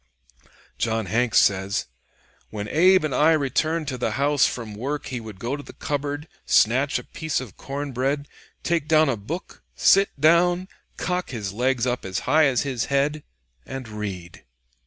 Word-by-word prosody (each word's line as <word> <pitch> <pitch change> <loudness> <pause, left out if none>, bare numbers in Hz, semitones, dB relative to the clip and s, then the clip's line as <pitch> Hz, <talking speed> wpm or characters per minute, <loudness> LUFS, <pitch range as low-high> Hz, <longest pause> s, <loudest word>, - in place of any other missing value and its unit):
John 110 -1 0
Hanks 115 +5 +1
says: 95 0 +2 0.6
"When 105 -1 -5
Abe 185 - +5
and 155 -3 -1
I 155 +2 +4
returned 155 +2 0
to 130 -3 -5
the - - -1
house 145 +1 +3
from 115 -4 -5
work 140 +7 -4
he 125 -3 -4
would 110 -4 -10
go 120 +6 -2
to 145 - -7
the - - -12
cupboard, 145 +1 -3 0.2
snatch 130 +6 +3
a - - -6
piece 160 -2 -3
of 125 -6 -9
corn 140 +1 -5
bread, 135 +3 -1 0.4
take 165 -3 0
down 155 -2 +4
a 130 - +1
book, 140 - -7
sit 195 +1 +5
down, 175 +4 +4 0.3
cock 180 0 -2
his 105 -6 -4
legs 125 +2 +1
up 125 0 -1
as 95 -1 -3
high 155 0 +4
as 130 -3 +2
his 130 -5 -2
head, 140 +2 0 0.4
and 135 -2 -7
read." 100 -5 -6
135 Hz, 170 wpm, -24 LUFS, 115-155 Hz, 0.6 s, Abe